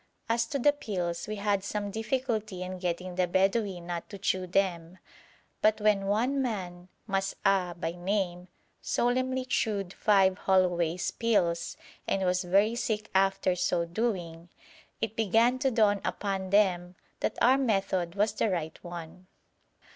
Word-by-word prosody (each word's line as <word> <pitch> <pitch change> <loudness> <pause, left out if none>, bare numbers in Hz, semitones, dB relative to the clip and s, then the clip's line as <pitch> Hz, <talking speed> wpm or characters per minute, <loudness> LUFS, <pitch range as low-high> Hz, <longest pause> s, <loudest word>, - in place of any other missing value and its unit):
As 230 0 +1
to 280 - -2
the 290 +2 +4
pills, 180 -10 -3
we 215 - -3
had 200 -1 0
some 205 0 -3
difficulty 220 -4 -2
in 185 0 -6
getting 180 0 -3
the 180 0 +1
Bedouin 190 0 +1
not 175 -1 -5
to 200 - -8
chew 185 -1 -1
them, 180 -2 -1 0.6
but 215 +1 +3
when 210 -2 +2
one 245 +7 +1
man, 180 -7 -4 0.2
Mas'ah 195 -2 0
by 165 - -2
name, 180 0 -2 0.3
solemnly 255 +1 0
chewed 200 -6 -1
five 195 -3 +3
Holloway's 180 -2 +1
pills 175 -8 0 0.3
and 195 - 0
was 180 +1 +1
very 200 +5 +3
sick 215 -3 -2
after 195 -1 +2
so 175 -1 0
doing, 175 -4 -3 0.5
it 225 -1 -2
began 225 +4 +3
to 265 - +2
dawn 210 -4 +3
upon 195 -2 -2
them 185 -3 +2 0.2
that - - -2
our 260 +3 +5
method 195 -7 0
was 210 +1 +1
the 215 - 0
right 160 -4 -3
one. 175 +1 -9
195 Hz, 145 wpm, -29 LUFS, 180-215 Hz, 0.6 s, our